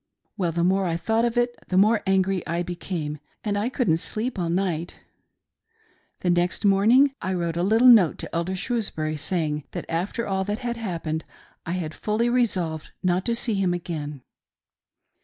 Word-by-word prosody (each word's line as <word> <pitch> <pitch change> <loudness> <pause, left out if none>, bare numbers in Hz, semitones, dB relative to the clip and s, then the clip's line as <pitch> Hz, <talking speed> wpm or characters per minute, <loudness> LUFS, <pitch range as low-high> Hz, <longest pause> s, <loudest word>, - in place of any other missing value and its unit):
Well, 180 -5 0
the 170 +1 0
more 190 +1 +2
I 165 -1 0
thought 225 +6 +1
of 240 0 -1
it, 240 0 +2
the 185 - 0
more 215 +3 +5
angry 190 -1 +2
I 170 +1 -1
became, 170 -4 -4 0.2
and 210 -2 -1
I 210 +4 0
couldn't 240 - +1
sleep 220 +5 -3
all 170 -2 -1
night 175 -2 -1 1.3
The 180 - +2
next 175 +4 0
morning 230 +8 +5
I 185 0 -1
wrote 170 -2 -2
a 170 - 0
little 220 +7 +4
note 215 -10 +7
to - - -7
Elder 170 +3 -1
Shrewsbury, 185 -8 -2
saying 150 -2 -1
that - - -4
after 185 +8 -2
all 190 -1 0
that 205 +1 -2
had 240 -1 -3
happened, 165 -7 -3 0.4
I 170 - -1
had 165 -4 -3
fully 220 +6 0
resolved 185 -11 0
not 185 0 +1
to 235 - +1
see 230 -1 -1
him 190 -3 +1
agaiiii. 150 -5 -5
185 Hz, 175 wpm, -25 LUFS, 170-220 Hz, 1.3 s, note